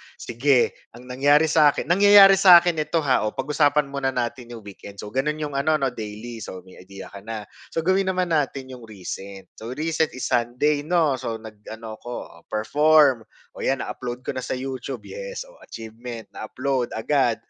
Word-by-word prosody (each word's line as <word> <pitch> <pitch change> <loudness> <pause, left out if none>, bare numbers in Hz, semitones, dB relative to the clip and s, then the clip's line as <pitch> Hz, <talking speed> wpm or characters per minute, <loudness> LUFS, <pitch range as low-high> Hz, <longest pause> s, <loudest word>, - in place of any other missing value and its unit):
Sige, 125 +2 +1 0.2
ang 120 - -13
nangyari 145 +5 +3
sa'kin, 150 -3 +4
nangyayari 195 +2 +7
sa'kin 175 -3 +7
ito, 155 +1 0
ha, 130 -6 +2
oh, 105 - -5
pag-usapan 145 -1 +1
muna 140 -1 -2
natin 125 -1 -3
yung 115 - -11
weekend. 100 0 -11
So 105 - -8
gano'n 135 +5 -1
yung 150 -1 -5
ano 140 +3 +1
'no, 135 -4 0
daily. 110 +1 -8
So, 95 -3 -8
may 95 0 -16
idea 95 +1 -11
ka 100 - -9
na. 110 +1 -6 0.2
So, 165 - -3
gawin 190 +2 +2
naman 185 -2 -1
natin 135 -3 -1
yung 125 -3 -11
recent, 100 -1 -8
so 110 - -8
recent 160 0 -1
is 130 - -4
Sunday 125 +5 +1
'no. 155 -3 +1
So, 115 -3 -4
nag 110 -2 -11
ano 110 -1 -8
ako, 120 - -9 0.3
oh, - - -26
perform. 140 +2 +3 0.2
Oh, - - -14
'yan 135 0 -1
na-upload 125 0 -6
ko - - -3
na - - -5
sa 130 - -4
YouTube, 130 0 -6
yes, - - -6
oh, - - -19
achievement, 115 +1 -9
na-upload 130 +3 -3
agad, 120 +1 +1
130 Hz, 185 wpm, -23 LUFS, 115-150 Hz, 0.3 s, nangyayari